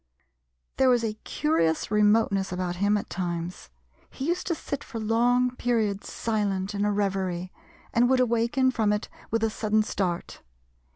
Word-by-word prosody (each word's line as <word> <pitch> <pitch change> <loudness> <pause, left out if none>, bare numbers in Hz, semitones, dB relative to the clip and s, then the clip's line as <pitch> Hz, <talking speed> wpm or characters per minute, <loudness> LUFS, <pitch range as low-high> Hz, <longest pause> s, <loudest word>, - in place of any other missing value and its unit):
There 265 - +4
was 245 -2 +3
a 220 -2 -1
curious 160 +3 0
remoteness 210 -2 +3
about 180 -1 -2
him 205 +2 +2
at 205 - -5
times. 175 -1 -4 0.4
He 265 - -6
used 350 +2 -1
to 340 - +1
sit 280 -2 -5
for 230 - -7
long 245 +3 +2
periods 220 -5 0
silent 205 -3 -1
in 200 0 -1
a 210 - +2
reverie, 190 -3 -1 0.4
and 245 +1 +4
would 260 -1 +4
awaken 245 +2 +2
from 220 -4 +1
it 210 0 -2 0.2
with 225 0 0
a 225 - +2
sudden 215 0 +1
start. 180 -5 -3
210 Hz, 160 wpm, -26 LUFS, 190-235 Hz, 0.4 s, There